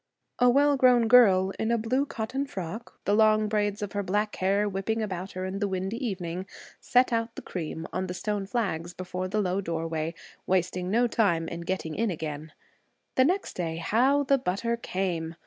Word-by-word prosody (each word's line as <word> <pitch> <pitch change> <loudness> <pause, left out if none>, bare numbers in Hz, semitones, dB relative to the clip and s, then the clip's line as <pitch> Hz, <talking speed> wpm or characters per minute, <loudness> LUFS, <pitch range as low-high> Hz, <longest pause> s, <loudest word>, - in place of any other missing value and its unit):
A 245 - +6
well 285 +3 +4
grown 250 -3 +5
girl 195 -6 +6
in 220 - 0
a 235 - +3
blue 255 +6 0
cotton 265 +5 -3
frock, 195 +2 -7
the 205 - +2
long 215 0 +4
braids 210 0 0
of 205 - -4
her 205 - -1
black 205 +3 -1
hair 200 +2 +2
whipping 200 +3 -2
about 190 -3 -4
her 185 0 -4
in 190 +1 -4
the 205 - 0
windy 190 +5 -3
evening, 185 -4 -3 0.3
set 250 0 +3
out 230 0 -1
the - - -7
cream 160 -2 -5
on 185 0 -2
the 180 - -5
stone 205 0 -2
flags 180 -7 -2
before 185 0 -4
the 210 +3 0
low 190 0 0
doorway, 165 -2 -3 0.3
wasting 180 0 0
no 235 +5 +3
time 195 -8 +1
in 170 +1 -5
getting 170 -2 -3
in 225 +4 0
again. 155 -2 -5 0.6
The 260 - +4
next 370 +6 0
day, 165 -2 -3
how 250 +12 +2
the 275 0 +3
butter 235 +1 -1
'came'! 175 -7 -3
200 Hz, 190 wpm, -27 LUFS, 180-230 Hz, 0.6 s, A